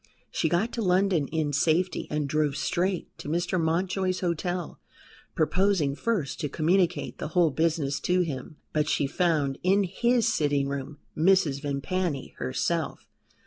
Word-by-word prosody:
She 160 - 0
got 195 +9 +1
to 235 - -3
London 180 -5 +2
in 155 -1 -1
safety 170 +6 +1
and 150 -1 -1
drove 150 -1 +1
straight 185 +1 -1
to - - -6
Mr. 175 +2 0
Mountjoy's 185 +3 0
hotel, 175 0 -2 0.6
proposing 180 -3 +2
first 175 - -2
to 150 - -2
communicate 170 +4 +1
the - - -3
whole 170 -3 +5
business 155 -1 0
to 180 +1 +2
him. 155 -2 -4 0.2
But 150 0 +1
she 145 - +1
found 145 -3 0
in 195 +3 +3
his 235 +6 +1
sitting 145 -9 +1
room 140 +1 -5 0.2
Mrs. 160 -5 +3
Vimpany 145 +1 -2
herself. 65 - -2
165 Hz, 145 wpm, -27 LUFS, 145-185 Hz, 0.6 s, whole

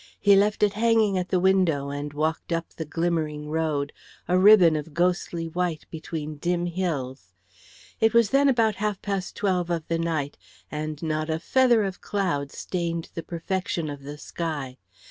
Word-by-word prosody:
He 200 -1 +6
left 205 +2 +2
it 205 -1 +3
hanging 220 -2 +3
at 180 - -4
the 185 - +2
window 175 -7 +2
and 145 +1 -4
walked 155 +4 -2
up 165 0 -1
the 160 - -7
glimmering 155 -2 -2
road, 155 -3 -1 0.3
a 180 - +2
ribbon 185 -5 +7
of 155 0 -5
ghostly 175 -1 0
white 175 -1 -2
between 155 -2 -5
dim 175 +3 0
hills. 140 - -3 0.7
It 220 0 +4
was 230 -2 +4
then 280 +1 +4
about 225 -6 +2
half 210 -2 -1
past 195 -2 -3
twelve 185 -4 0
of 165 -2 -2
the 165 0 0
night, 155 -4 -2 0.3
and 155 0 -4
not 155 0 -1
a 160 - 0
feather 240 +5 +3
of 190 -2 -4
cloud 170 -9 -1
stained 170 -2 -3
the 165 - -4
perfection 170 -1 -3
of 145 -1 -8
the 145 +2 -8
sky. 150 -5 -5
170 Hz, 170 wpm, -25 LUFS, 155-190 Hz, 0.7 s, ribbon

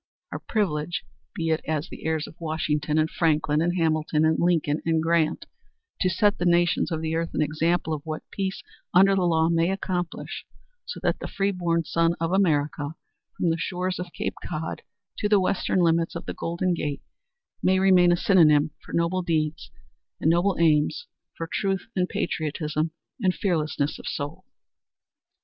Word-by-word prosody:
Our - - -4
privilege 175 -6 -1 0.3
be 165 -1 -1
it 160 - +1
as 155 -1 -1
the - - -10
heirs 160 -1 0
of - - -11
Washington 155 -2 -1
and 155 0 +3
Franklin 155 -2 +1
and 175 +2 0
Hamilton 155 -1 +1
and 160 0 +2
Lincoln 165 -3 +1
and 165 -1 +1
Grant 165 -1 +1 0.5
to 185 - +2
set 205 +3 +2
the 175 - 0
nations 175 +1 +2
of 160 -1 -2
the 160 0 -2
earth 165 +1 -2
an - - +2
example 160 +2 0
of 150 - -3
what 155 -1 -5
peace 195 -1 -3 0.3
under 195 +2 +7
the 195 - +2
law 160 -2 +3
may 165 +1 +2
accomplish, 180 -2 -3 0.4
so - - -5
that - - +1
the - - -5
free 195 0 0
born 170 -3 0
son 165 +1 +1
of 165 +1 -1
America 150 -5 +1 0.4
from 170 - +1
the 165 - -1
shores 180 +1 -2
of 180 -1 -5
Cape 195 +5 -3
Cod 160 -1 -4 0.4
to 210 - 0
the 205 -1 +5
western 185 0 0
limits 165 -1 +2
of 170 - -6
the - - -4
Golden 170 +2 -1
Gate 145 -4 -3 0.6
may 190 0 +3
remain 185 -2 +5
a 175 - +3
synonym 155 -6 +4
for - - -12
noble 170 +2 +1
aims 155 -1 -1 0.5
and 160 - +3
noble 175 +3 +2
deeds, 160 - +2 0.3
for 165 - -3
truth 195 +2 -1
and 180 -1 +1
patriotism 155 0 -2 0.3
and 185 -3 +2
fearlessness 155 -4 -1
of - - -9
soul." 155 +6 -5
165 Hz, 175 wpm, -25 LUFS, 155-180 Hz, 0.6 s, under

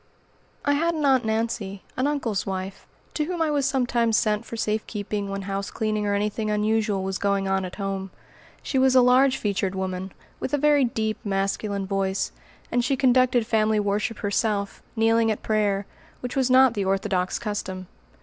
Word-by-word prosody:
I 285 - +3
had 335 +3 +1
an 305 -2 -1
"Aunt 260 -4 +4
Nancy," 220 -3 -2
an 260 - +1
uncle's 255 -9 -1
wife, 190 0 -5 0.3
to 305 - 0
whom 350 +1 -4
I 320 -2 +1
was 285 -2 +1
sometimes 240 -4 +1
sent 215 +1 +1
for 230 - -7
safe 215 0 -1
keeping 205 -1 -3
when 195 0 -4
house 195 0 -3
cleaning 215 -1 -1
or 205 - +1
anything 210 +1 -1
unusual 210 -1 +1
was 190 0 -3
going 200 -1 +1
on 190 0 0
at 180 - -7
home. 195 -1 -3 0.5
She 265 - 0
was 260 0 +4
a 255 - +7
large 255 +2 +5
featured 195 -2 -1
woman, 190 0 -3 0.3
with 290 - -1
a - - 0
very 290 -1 +4
deep 220 -2 -2
masculine 195 0 -1
voice, 195 0 -1 0.4
and 245 - +2
she 265 +2 +1
conducted 255 -2 +3
family 220 -1 +2
worship 210 +2 -1
herself, 205 0 -1
kneeling 225 0 +3
at 215 - -2
prayer, 205 -2 +1 0.4
which 250 +2 -5
was 260 -2 +2
not 260 -1 +6
the 205 -3 -1
Orthodox 190 -1 0
custom. 195 -4 -4
215 Hz, 180 wpm, -25 LUFS, 195-250 Hz, 0.5 s, a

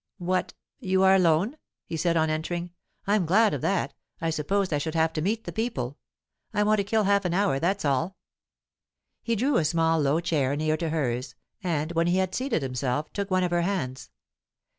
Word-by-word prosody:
"What! 185 0 -1 0.2
you 190 0 +1
are 190 0 +6
alone?" 185 - +3 0.3
he - - -5
said 165 +1 +1
on 160 -1 +2
entering. 170 +3 -3 0.3
"I'm 200 -4 +2
glad 210 +5 +4
of - - -3
that. 195 - 0 0.3
I 165 0 -1
supposed 185 +4 0
I 145 - +1
should 160 +2 -3
have 160 0 +2
to 155 - -2
meet 215 +6 -1
the - - -6
people. 145 - -3 0.6
I 210 - +3
want 215 0 +3
to - - +2
kill 215 +2 +1
half 200 0 +3
an 175 -1 -1
hour, 195 -8 +2
that's 190 +3 0
all." 145 +8 0 1.0
He 230 - 0
drew 260 +5 +2
a - - +2
small 165 +1 +2
low 145 +3 +2
chair 150 -5 0
near 155 +1 +1
to 165 0 -2
hers, 130 -5 -2 0.3
and, 160 -3 -1
when 170 0 +1
he 175 +1 +2
had 185 -1 0
seated 255 - -1
himself, 130 +3 -2
took 200 0 -3
one 185 -1 +2
of 180 - 0
her 175 0 +2
hands. 165 -9 -3
170 Hz, 205 wpm, -26 LUFS, 155-195 Hz, 1.0 s, are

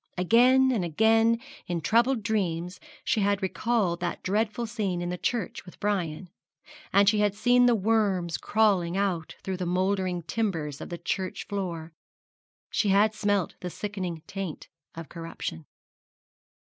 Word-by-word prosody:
Again 250 +8 +5
and 220 -7 0
again 225 +7 +3 0.3
in 175 -1 -1
troubled 235 +6 +2
dreams 180 -5 -1 0.2
she - - +1
had 200 0 +1
recalled 190 -3 0
that 175 -1 -3
dreadful 215 +4 0
scene 210 -6 -2
in 175 0 -3
the 180 - -3
church 235 -7 -2
with 180 - -14
Brian; 185 -4 -2 0.6
and 200 +1 +5
she 210 +1 +4
had 205 -1 +2
seen 245 +3 +4
the 240 - +5
worms 195 -5 +1
crawling 195 -5 +2
out 185 -5 -1
through 190 -1 -3
the 180 -1 -3
mouldering 185 -1 0
timbers 160 -6 -2
of - - -7
the 175 - -5
church 185 +1 -3
floor 170 -5 -4 0.8
she 210 - +1
had 205 +2 +4
smelt 205 -3 0
the 180 - -5
sickening 185 -5 -5
taint 195 -5 -6 0.3
of 165 -1 -7
corruption. 165 - -7
195 Hz, 145 wpm, -27 LUFS, 175-220 Hz, 0.8 s, Again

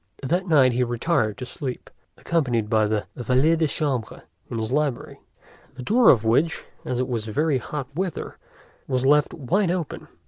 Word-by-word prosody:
That 175 +7 0
night 135 -6 +5
he 125 +1 +1
retired 120 - 0
to 125 - -6
sleep, 130 0 -6 0.3
accompanied 125 -10 -1
by 110 -1 +3
his 105 -1 0
valet 130 +7 +3
de 160 -1 +1
chambre, 135 -6 -3 0.3
in 115 - -4
his 110 0 -3
library, 145 -3 -1 0.6
the 130 - -8
door 235 - +5
of 115 -3 +5
which, 145 +9 +2 0.2
as 125 - -3
it 130 - 0
was 115 -4 -2
very 145 +5 +1
hot 145 0 -5
weather, 180 0 -4 0.5
was 130 -1 0
left 150 +1 +4
wide 170 +7 0
open. 175 -4 -3
130 Hz, 170 wpm, -24 LUFS, 120-160 Hz, 0.6 s, night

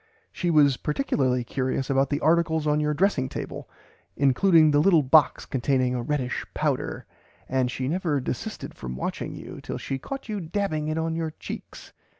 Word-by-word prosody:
She 175 - -2
was 145 -5 +5
particularly 135 - 0
curious 130 +2 -2
about 135 0 +2
the 145 - -1
articles 160 -1 +2
on 150 0 +2
your 150 0 0
dressing 150 -7 +1
table, - - -6 0.5
including 155 +3 +5
the 145 - +4
little 165 -1 +5
box 145 +2 +4
containing 130 -1 0
a 125 - -1
reddish 130 -1 -2
powder, - - -1 0.4
and 130 -1 +1
she 130 +1 -3
never 160 -2 0
desisted 125 - -5
from 65 -1 -7
watching 65 - -4
you - - -9
till - - -5
she 135 - -4
caught 270 - -7
you 210 -2 -3
dabbing 165 -3 -2
it 155 +1 -1
on 160 0 -1
your 165 -1 -2
cheeks. - - -9
150 Hz, 170 wpm, -25 LUFS, 130-165 Hz, 0.5 s, was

